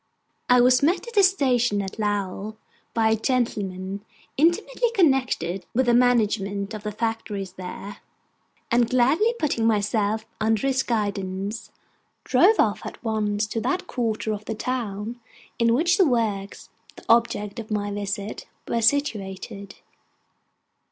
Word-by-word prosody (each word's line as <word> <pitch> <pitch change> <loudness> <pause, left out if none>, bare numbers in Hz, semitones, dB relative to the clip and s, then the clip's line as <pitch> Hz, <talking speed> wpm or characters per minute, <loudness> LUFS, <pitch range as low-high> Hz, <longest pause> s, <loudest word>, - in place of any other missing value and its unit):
I 250 0 +6
was 250 +1 +5
met 340 +10 +1
at 470 - -8
the 410 - +5
station 255 - +2
at 195 +2 -5
Lowell 205 0 -2 0.4
by 220 -1 +3
a - - +4
gentleman 205 -5 -2 0.3
intimately 415 - +2
connected 255 - +1
with 260 +2 +3
the 240 - +3
management 215 -4 +2
of 215 - -6
the 210 0 -4
factories 210 -3 -3
there; 190 +2 -8 0.7
and 235 0 +3
gladly 295 - +3
putting 235 - 0
myself 215 0 +1
under 220 +1 +1
his 265 -1 +2
guidance, 200 -3 -3 0.5
drove 365 - +4
off 210 -2 +2
at - - -9
once 215 -2 0
to 220 +1 -3
that 280 +10 -1
quarter 220 -3 -2
of 210 0 -7
the 225 - -3
town 230 -1 -4 0.4
in 230 0 +3
which 345 +8 +2
the 375 - +6
works, 215 -6 -2 0.2
the - - -14
object 230 -2 +2
of 220 - -8
my 205 -1 -2
visit, 205 +1 -4 0.2
were 230 - 0
situated. 205 -6 -1
220 Hz, 140 wpm, -24 LUFS, 205-250 Hz, 0.7 s, I